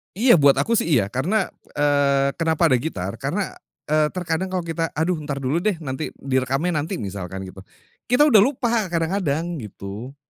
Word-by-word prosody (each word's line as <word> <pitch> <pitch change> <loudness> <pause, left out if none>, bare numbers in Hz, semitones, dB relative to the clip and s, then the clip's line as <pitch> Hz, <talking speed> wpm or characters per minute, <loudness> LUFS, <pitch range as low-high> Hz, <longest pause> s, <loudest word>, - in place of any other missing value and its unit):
Iya, 225 - +5
buat 140 -1 +6
aku 230 -1 +2
sih, - - -2
iya, 100 -3 +1
karena, 185 - 0 0.2
eee, 140 -1 +2
kenapa 160 -1 +2
ada 125 - +4
gitar? 100 - -4
Karena, - - -2 0.3
eee, 155 0 +2
terkadang 175 0 -1
kalau 185 -1 -2
kita, 165 0 -2
"Aduh, 165 +2 0
ntar 140 -2 -3
dulu 145 +6 +1
deh, 210 +1 0
nanti, 135 +2 -3
direkamnya 135 +5 -1
nanti." 165 +6 -3
misalkan 95 - -5
gitu, 95 +1 -10 0.5
kita 250 +4 +4
udah 255 -8 +6
lupa 235 -3 +1
kadang-kadang, 170 -2 -1
gitu. 105 +4 -8
155 Hz, 170 wpm, -22 LUFS, 130-180 Hz, 0.5 s, buat